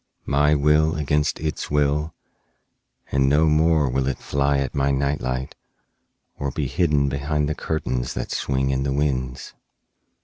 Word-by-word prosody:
My 75 +2 +3
will 75 +2 +3
against 75 0 0
its 80 0 -3
will, 75 +1 0 1.0
and 70 0 +2
no 75 +3 +4
more 80 -1 +3
will 65 +1 0
it 70 - -1
fly 70 0 0
at 70 -2 -2
my 70 0 +1
night 70 +1 0
light 65 +1 -3 0.9
or 70 - -1
be 70 +2 -3
hidden 70 +1 +1
behind 75 +2 -1
the 75 - -1
curtains 65 -6 -3
that - - -4
swing 65 0 0
in 65 0 0
the 70 0 -1
winds. 65 -3 -2
70 Hz, 150 wpm, -23 LUFS, 70-75 Hz, 1.0 s, no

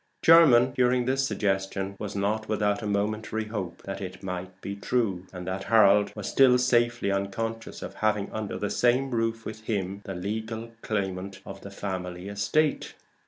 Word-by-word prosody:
Jermyn, 130 -7 +7
hearing 125 0 +3
this 135 +1 +1
suggestion, 95 -1 -1
was 105 -1 -5
not 105 +2 -1
without 105 -1 +1
a 105 - -3
momentary 105 +2 -1
hope 105 -5 -5
that 95 0 -6
it 95 0 -7
might 90 0 -6
be 100 +1 -5
true, 100 -4 -1
and 90 -1 -7
that 95 +1 -4
Harold 105 -2 +5
was 105 -2 -5
still 130 -2 +5
safely 120 -3 +2
unconscious 115 +4 -3
of - - -6
having 105 -2 0
under 110 -2 -4
the 105 - -2
same 125 +2 +2
roof 115 -1 -1
with 110 0 -6
him 100 -2 -2
the 95 - -5
legal 110 +4 -4
claimant 95 -2 -3
of - - -9
the 100 - -8
family 95 -2 -5
estate. 100 +10 0
105 Hz, 165 wpm, -27 LUFS, 95-115 Hz, -, Jermyn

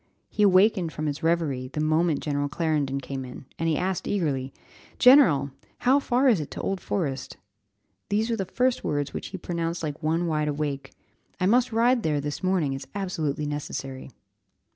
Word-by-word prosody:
He - - -2
awakened 190 -3 +4
from 155 0 -4
his 145 -1 -3
reverie 160 -6 0
the 140 - -6
moment 155 +1 +2
General 145 -1 -1
Clarendon 150 -3 -1
came 135 0 -5
in, 130 +1 -10
and 165 0 +1
he 155 - +1
asked 185 0 -2
eagerly, 140 -9 -1 0.5
"General! 175 - +6 0.3
how 265 +3 +3
far 260 0 +2
is 225 -8 +4
it 150 - -5
to - - -6
Old 195 -2 -2
Forest?" 140 -8 -3 0.7
These 220 +3 +1
were - - +1
the 195 -3 -2
first 250 +6 0
words 145 -1 -2
which - - -5
he 190 - -6
pronounced 170 -1 -3
like 150 0 -4
one 165 +2 0
wide 155 -2 0
awake. 145 -2 -3 0.5
"I 185 - +1
must 245 +5 +3
ride 235 +2 +3
there 150 -6 0
this 145 +1 -4
morning; 185 -7 +1
it's 135 - -6
absolutely 160 -7 -2
necessary." 140 -3 -5
160 Hz, 180 wpm, -26 LUFS, 145-195 Hz, 0.7 s, General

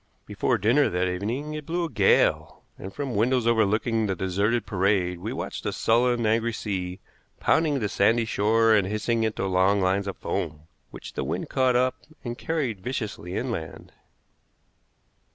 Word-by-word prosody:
Before - - 0
dinner 120 +9 +3
that 90 +1 0
evening 115 +12 -3
it 150 -1 -7
blew 170 +1 -1
a - - -5
gale, - - +2
and 95 - -8
from 135 +3 -4
windows 120 +3 +1
overlooking 110 0 +2
the 95 - -1
deserted 100 +5 0
parade 95 -3 0
we - - -5
watched - - -5
a - - 0
sullen, 120 +1 +2
angry 115 +2 +1
sea 95 -4 -4 0.4
pounding 155 -3 +2
the 110 -5 -1
sandy 115 +4 +2
shore 110 +1 +3
and 100 -3 +3
hissing 110 +3 0
into 110 -3 -1
long 95 +2 +2
lines 95 +1 +1
of 100 - -5
foam, 75 0 -3 0.3
which - - -10
the - - -3
wind - - -4
caught 130 -1 +2
up 125 +1 +1 0.2
and 120 -1 -5
carried 135 - -2
viciously 105 -6 -4
inland. 115 -10 -5
110 Hz, 160 wpm, -25 LUFS, 95-120 Hz, 0.4 s, dinner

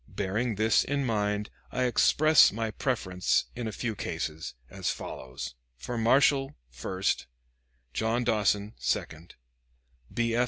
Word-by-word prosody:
Bearing 105 +4 -1
this 110 +2 +3
in 140 0 -1
mind, 105 -2 -1 0.2
I 130 - 0
express 155 +5 +5
my 110 +1 -2
preference 95 -7 0
in 120 -2 -3
a - - -3
few 115 +1 -3
cases, 80 -7 -4
as - - -3
follows: 65 -1 -6 0.2
for 120 - -5
Marshal, 135 +4 +3 0.2
first, 95 +9 -2 0.7
John 115 +2 0
Dawson, 105 -2 +1
second, 80 +2 -3 0.8
B. 115 -1 0
F. 115 - +2
110 Hz, 125 wpm, -29 LUFS, 100-120 Hz, 0.8 s, express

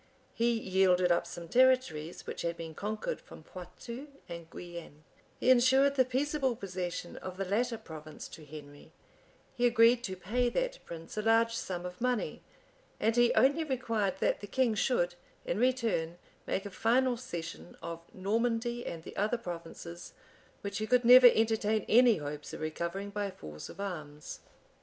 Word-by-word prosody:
He 235 +1 +2
yielded 185 -3 +3
up 170 - +2
some 170 -1 -8
territories 245 -9 +2
which - - -5
had 170 0 -2
been 165 -1 -7
conquered 215 - -3
from - - -13
Poictou 235 +9 -9 0.2
and 170 -1 -8
Guienne; 170 -4 -9 0.4
he 255 - +4
insured 265 +3 +5
the 265 -2 +4
peaceable 265 0 0
possession 180 -4 -5
of 185 -1 -7
the 195 - -2
latter 230 +5 0
province 155 -5 -9
to 160 - -11
Henry; 145 -1 -12 0.6
he 245 0 +3
agreed 235 0 +5
to 190 - -4
pay 230 +7 0
that - - -2
prince 165 +3 -9
a - - +1
large 225 +1 +3
sum 180 -5 -4
of 180 +2 -8
money; 250 -2 -1 0.6
and 225 +1 +2
he 240 0 +5
only 285 +5 +4
required 230 -9 -1
that - - +2
the 205 - -7
king 245 +2 +2
should, 195 -6 +1 0.3
in 180 - -1
return, 230 -10 +1 0.3
make 195 - -1
a 200 - -6
final 245 +5 +2
cession 170 -8 -7
of 170 0 -5
Normandy 230 +4 -1
and 165 -1 -6
the - - -10
other 215 +4 +1
provinces, 170 -3 -8 0.5
which 200 0 -4
he 215 - -2
could 250 0 +3
never 250 +1 +10
entertain 220 -1 +1
any 235 0 +6
hopes 150 -1 -6
of - - -7
recovering 170 +5 -3
by 205 -1 -2
force 75 - -9
of - - -12
arms. 155 -7 -6
205 Hz, 165 wpm, -31 LUFS, 170-245 Hz, 0.6 s, never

